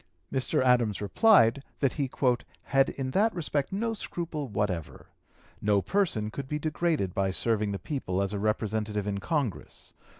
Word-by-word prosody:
Mr. 130 0 +1
Adams 120 -5 +3
replied, 135 - +4 0.2
that 135 -3 +2
he 140 -3 -1 0.5
"had 135 0 +3
in 130 -1 -4
that 215 +9 +3
respect 145 -4 -1
no 225 +4 -1
scruple 165 -8 -4
whatever. 95 -7 -3 0.6
No 105 -1 +3
person 165 - 0
could 135 +3 -5
be 150 - -2
degraded 155 - 0
by 95 0 +1
serving 105 +1 0
the 100 - -2
people 95 -8 -3
as 100 +1 0
a 100 - -2
Representative 105 -1 -1
in 100 -1 -2
Congress. 140 - -3
125 Hz, 155 wpm, -28 LUFS, 105-150 Hz, 0.6 s, replied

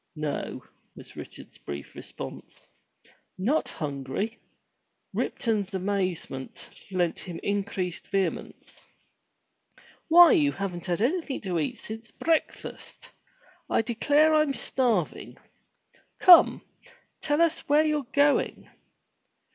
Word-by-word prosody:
"No," 150 -2 -4 0.3
was - - -13
Richard's - - -11
brief 70 -1 -8
response. - - -10 0.7
"Not 250 +12 0
hungry!" 145 - -4 0.7
Ripton's 210 -5 -1
amazement 185 -8 -3 0.2
lent 180 -3 -1
him 175 -3 -7
increased 195 -3 -2
231 195 -3 -1
MY - - -16
BOOK - - -19
HOUSE - - -19
vehemence. - - -18 1.2
"Why 345 0 +8
you 290 -3 +4
haven't 190 -2 -5
had 175 +3 0
anything 310 +1 -1
to 180 -4 -2
eat 150 - -2
since 225 +1 -9
break 325 -1 0
fast! - - -11 0.6
I - - +2
declare 290 +7 +3
Fm 305 -3 +2
starving. 230 - -1 0.8
Come, 355 -2 +7 0.6
tell 295 -1 0
us 335 -1 +3
where 300 +2 +5
youVe 300 -4 -1
going.' 285 0 +1
215 Hz, 115 wpm, -27 LUFS, 180-295 Hz, 1.2 s, Why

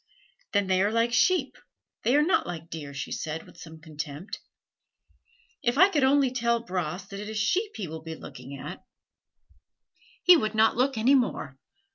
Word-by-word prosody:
"Then 200 -1 +3
they 185 0 +2
are 205 +2 +2
like 230 +1 +1
sheep 370 - +2 0.4
they 250 - +2
are 295 - +5
not 345 - +2
like 165 -1 -7
deer," 150 -3 -6
she 140 0 -6
said 160 0 -4
with - - -17
some 160 -1 -11
contempt. 150 +2 -7 1.2
"If 240 +2 0
I 375 +5 +7
could 295 -7 +1
only 270 -1 +4
tell 235 -1 +1
Bras 180 -2 -3
that 200 - -7
it 210 +1 -6
is 220 - -4
sheep 375 - 0
he 200 -5 -4
will 160 0 -7
be 160 0 -7
looking 135 0 -10
at, - - -8 1.4
he 360 - +9
would 215 -8 0
not 220 +1 +4
look 255 +1 +1
any 240 +5 +4
more. 255 -3 0
215 Hz, 180 wpm, -27 LUFS, 160-255 Hz, 1.4 s, he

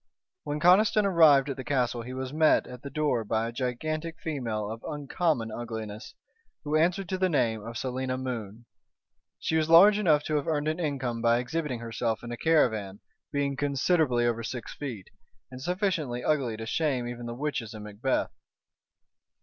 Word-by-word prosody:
When 145 +1 -2
Conniston 205 +5 +5
arrived 155 -7 +6
at 140 -2 -4
the 130 - -5
castle 125 -3 0
he 125 +2 -7
was 130 +1 -5
met 155 0 +4
at 125 -1 -10
the 140 - -7
door 145 -5 0
by 110 +1 -1
a - - -4
gigantic 155 +7 -3
female 115 -9 -3
of 110 +2 -7
uncommon 145 -4 -1
ugliness, 110 -2 -6 0.5
who 150 0 -1
answered 175 +4 +2
to 185 - -2
the 185 0 +2
name 115 -8 +1
of 115 +1 -6
Selina 130 0 -2
Moon. 120 -4 -5 0.7
She 160 - -1
was 155 0 +1
large 200 +6 +8
enough 155 -7 +3
to 155 - 0
have 145 - -3
earned 150 -2 0
an 155 +2 -1
income 135 -7 -2
by 115 0 +4
exhibiting 130 0 -3
herself 115 0 -2
in 120 - -6
a 120 - -4
caravan, 110 -12 +1 0.3
being 140 -1 0
considerably 140 -2 +1
over 115 -1 0
six 115 +1 -6
feet, 120 -10 -7 0.4
and 130 0 -9
sufficiently 170 - -1
ugly 130 -7 0
to 115 - -6
shame 130 -1 0
even 120 0 -6
the 120 - -5
witches 125 -5 -3
in 105 - -8
Macbeth. 105 +5 -1
130 Hz, 175 wpm, -28 LUFS, 120-155 Hz, 0.7 s, large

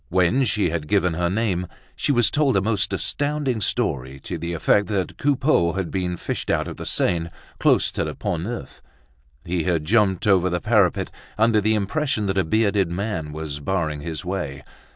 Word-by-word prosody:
When 95 +9 +3
she 100 -6 +1
had 80 -3 -3
given 90 -3 +2
her 85 +1 0
name, 95 -3 0 0.3
she - - 0
was 120 -5 +3
told 145 -7 +2
a - - +3
most 105 -1 0
astounding 145 -5 -1
story 65 -7 -1
to - - -5
the 85 +2 -3
effect 100 +4 +2
that 95 -3 -2
Coupeau 135 - +2
had 95 -3 -3
been 90 -2 -2
fished - - -4
out - - +1
of - - -7
the - - -6
Seine 85 -1 +1 0.3
close - - +3
to - - -2
the - - -4
Pont 85 +1 -2
Neuf. 115 - -6 0.6
He 85 0 -1
had 85 -4 0
jumped 100 -1 +2
over 95 -3 +4
the 90 0 -1
parapet, 105 -5 +2 0.3
under 110 -1 +4
the 110 +2 +2
impression 110 +2 0
that 95 -1 -1
a - - +3
bearded 100 +1 +2
man 85 -4 -3
was 75 -1 -5
barring 80 -3 -1
his 80 +1 -5
way. 80 -7 -4
95 Hz, 190 wpm, -23 LUFS, 85-110 Hz, 0.6 s, over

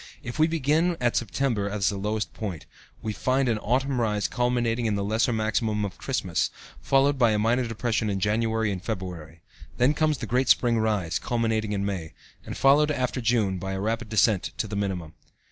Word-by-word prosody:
If 120 +5 -6
we 155 - +5
begin 165 +2 +1
at 120 -1 +1
September 115 -3 0
as 100 -2 +1
the 100 - -3
lowest 105 +2 -2
point, 95 -8 -5 0.4
we 110 - -2
find 130 +5 +1
an 115 -3 +1
autumn 130 +3 0
rise 105 -2 0
culminating 120 -1 0
in 105 - 0
the 100 - -1
lesser 110 +4 +1
maximum 110 -1 0
of 95 - -7
Christmas, 100 -11 -1 0.3
followed 135 - +2
by 120 -3 +5
a - - +1
minor 120 +3 +1
depression 115 -1 -1
in 100 -1 -1
January 110 +1 +1
and 95 -2 -4
February. 90 -7 -6 0.4
Then 125 +4 +4
comes 155 -1 +1
the 115 - -5
great 125 +4 0
spring 120 -2 +4
rise, 105 -7 0
culminating 110 -3 -1
in 100 -1 -1
May, 90 -6 -4 0.3
and - - -7
followed 145 +2 +5
after 130 -3 -1
June 110 -5 +1
by 95 +1 -4
a 95 - -3
rapid 110 +2 -2
descent 110 -2 +2
to - - -1
the 105 - -5
minimum. 95 -5 -3
110 Hz, 195 wpm, -26 LUFS, 100-125 Hz, 0.4 s, we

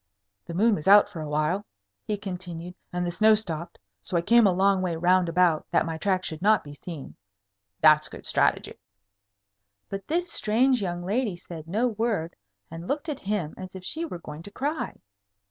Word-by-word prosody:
"The 170 - -6
moon 220 +5 +4
was 155 -5 -3
out 205 +1 +8
for 175 -6 -7
a 155 - -5
while," 155 +7 0 0.4
he 210 - -1
continued, 180 -3 -6 0.2
"and 180 0 -2
the 175 - -1
snow 215 +4 +5
stopped. 170 -5 -5 0.2
So 180 - -2
I - - +2
came 235 +2 +6
a - - +4
long 190 +1 +3
way 180 -3 -1
round 180 +1 +3
about, 170 -2 +2
that - - +2
my 165 -1 -4
tracks 185 -1 0
should 160 0 -6
not 215 +2 +4
be 145 - -10
seen. 150 0 -8 0.7
That's 155 -1 +6
good - - -11
strategy." - - +1 1.1
But 195 0 -6
this 345 +3 -1
strange 245 +3 +2
young 175 -2 -3
lady 210 -1 0
said 165 -3 -10
no 215 +8 +1
word, 215 -7 -1 0.4
and 165 +2 -7
looked 295 +3 -2
at 295 - -3
him 195 -6 -2
as 185 0 -8
if 185 -1 -9
she 320 - -2
were 315 - -5
going 150 -2 -9
to 205 - -11
cry. 290 +8 -3
185 Hz, 195 wpm, -26 LUFS, 170-215 Hz, 1.1 s, out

